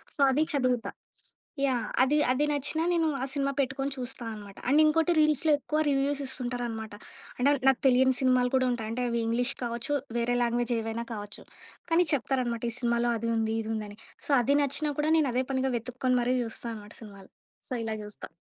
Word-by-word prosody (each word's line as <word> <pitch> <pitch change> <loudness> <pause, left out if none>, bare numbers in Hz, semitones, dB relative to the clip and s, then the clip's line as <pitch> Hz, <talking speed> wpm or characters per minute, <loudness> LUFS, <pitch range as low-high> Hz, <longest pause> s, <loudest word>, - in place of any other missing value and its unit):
So, - - -16
అది 290 +4 +3
చదువుతా. 255 -4 0 0.8
Yeah! 245 -4 0 0.2
అది 285 +3 +2
అది 270 +4 +2
నచ్చినా 295 +3 -1
నేను 335 -2 +2 0.2
ఆ - - 0
సినిమా 275 -1 0
పెట్టుకొని 270 +1 -1
చూస్తా 250 -1 -6
అనమాట. 205 -2 -11
అండ్ 290 +3 +5
ఇంకోటి 325 +2 +3
రీల్స్‌లో 305 0 +3
ఎక్కువ 300 +3 -2
రివ్యూస్ 280 +1 +1
ఇస్తుంటారనమాట. 240 -4 -4 0.4
అంటే 250 +3 +3
అవి 280 - -2
నాకు 265 - +2
తెలియని 260 0 +4
సినిమాలు 255 -1 +3
కూడా 260 -1 +3
ఉంటాయి. 230 -3 -3
అంటే 250 +2 -2
అవి 235 0 0
ఇంగ్లీష్ 245 +3 0
కావచ్చు, 240 +5 -2 0.2
వేరే 240 +1 +1
లాంగ్వేజ్ 240 0 0
ఏవైనా 225 +1 -4
కావచ్చు. 205 -1 -8 0.5
కానీ 345 +2 +4
చెప్తారనమాట, 250 -3 -1
ఈ - - -5
సినిమాలో 235 -1 +1
అది 230 +1 -2
ఉంది, 220 0 0
ఇది 220 - -4
ఉంది 215 -1 -3
అని. 205 - -12 0.3
సో, - - -2
అది 275 +4 +2
నచ్చినా 295 +2 -1
కూడా 305 +1 +2
నేను 300 -4 +2
అదే 255 +1 +1
పనిగా 265 0 0
వెతుక్కొని 250 +2 -1
మరి 250 +1 +1
జూస్తా 230 +1 -6
అనమాట 210 -1 -11
సినిమాలు. 200 -3 -13 0.4
సో, - - -3
ఇలా 220 -1 -2
చూస్తా. 210 - -9
250 Hz, 190 wpm, -28 LUFS, 235-275 Hz, 0.8 s, అండ్